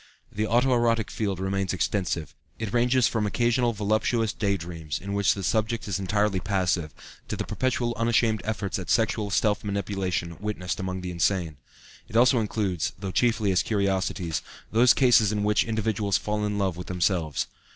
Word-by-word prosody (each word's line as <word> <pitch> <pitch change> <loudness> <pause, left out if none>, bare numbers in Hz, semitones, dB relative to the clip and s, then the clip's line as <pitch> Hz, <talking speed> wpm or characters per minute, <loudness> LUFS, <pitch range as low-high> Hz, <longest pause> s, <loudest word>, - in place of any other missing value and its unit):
The 105 +1 -1
auto 125 +3 +3
erotic 115 -2 +1
field 100 -4 -2
remains 95 0 -1
extensive; 90 -4 -1 0.2
it 110 -3 -4
ranges 125 +1 +3
from 110 -2 0
occasional 120 +2 +1
voluptuous 110 +1 0
day 100 -2 0
dreams, 80 -5 -5
in 100 +2 -6
which 100 -1 +2
the 100 - -5
subject 110 +3 0
is 100 -2 -1
entirely 100 0 +1
passive, 90 -5 0 0.4
to - - -3
the - - -3
perpetual 130 -2 -1
unashamed 115 -1 +2
efforts 105 -2 -2
at 90 - -7
sexual 110 -2 +1
self 105 +2 +1
manipulation 95 -4 -2
witnessed 105 -4 -3
among 95 -1 -3
the 90 0 -4
insane. 85 -2 0 0.5
It - - -11
also 125 +1 +5
includes, 100 -6 -1
though 95 -1 -5
chiefly 110 -2 +2
as 95 - +3
curiosities, 95 -5 -1 0.3
those 120 +3 +5
cases 120 -6 +5
in 105 -1 -1
which 105 0 +3
individuals 110 -4 0
fall 105 +4 -2
in 105 0 -2
love 95 -4 0
with 90 - -7
themselves. 90 -4 0
100 Hz, 170 wpm, -26 LUFS, 95-110 Hz, 0.5 s, also